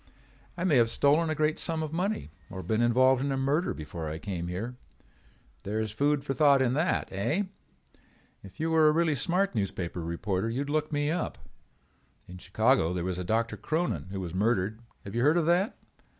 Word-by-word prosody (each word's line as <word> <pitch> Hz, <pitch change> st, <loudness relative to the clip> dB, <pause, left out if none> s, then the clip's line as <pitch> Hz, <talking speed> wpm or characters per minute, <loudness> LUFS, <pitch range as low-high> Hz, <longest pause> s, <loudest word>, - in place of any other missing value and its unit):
I 175 Hz, -, -2 dB
may 165 Hz, -7 st, +4 dB
have 115 Hz, -1 st, +4 dB
stolen 150 Hz, +6 st, +3 dB
a 155 Hz, -, 0 dB
great 155 Hz, +1 st, +1 dB
sum 160 Hz, -1 st, -1 dB
of 155 Hz, 0 st, -5 dB
money 185 Hz, -, -2 dB, 0.2 s
or 95 Hz, -2 st, -7 dB
been 110 Hz, +6 st, 0 dB
involved 130 Hz, +2 st, +4 dB
in 140 Hz, -, -1 dB
a 135 Hz, -, 0 dB
murder 140 Hz, +6 st, +1 dB
before 80 Hz, +1 st, -6 dB
I 80 Hz, -, -4 dB
came 85 Hz, -2 st, -4 dB
here. 105 Hz, +8 st, -4 dB, 0.9 s
There 105 Hz, +2 st, -3 dB
is 110 Hz, -1 st, -2 dB
food 145 Hz, +5 st, +1 dB
for 135 Hz, -, -2 dB
thought 140 Hz, -2 st, +5 dB
in 130 Hz, -2 st, +2 dB
that, 160 Hz, +6 st, +1 dB
eh? 125 Hz, -, 0 dB, 1.0 s
If 95 Hz, -1 st, -14 dB
you 165 Hz, +1 st, 0 dB
were 160 Hz, -1 st, +5 dB
a -, -, +6 dB
really 165 Hz, -1 st, +2 dB
smart 180 Hz, +7 st, 0 dB
newspaper 95 Hz, -5 st, -3 dB
reporter 95 Hz, +5 st, -2 dB
you 120 Hz, +4 st, -2 dB
would 145 Hz, 0 st, -4 dB
look 155 Hz, 0 st, 0 dB
me 145 Hz, 0 st, 0 dB
up. 170 Hz, 0 st, -2 dB, 0.9 s
In 90 Hz, 0 st, -10 dB
Chicago 95 Hz, -2 st, +2 dB
there 90 Hz, -1 st, -2 dB
was 90 Hz, -1 st, -2 dB
a -, -, -2 dB
Doctor 110 Hz, +3 st, 0 dB
Cronin 155 Hz, -, -2 dB
who 95 Hz, 0 st, -5 dB
was 90 Hz, -3 st, -5 dB
murdered. 110 Hz, +2 st, 0 dB, 0.2 s
Have 100 Hz, -, -8 dB
you 120 Hz, -, 0 dB
heard 150 Hz, +6 st, +4 dB
of 170 Hz, -, +2 dB
that? 180 Hz, +5 st, +2 dB
125 Hz, 205 wpm, -28 LUFS, 95-155 Hz, 1.0 s, a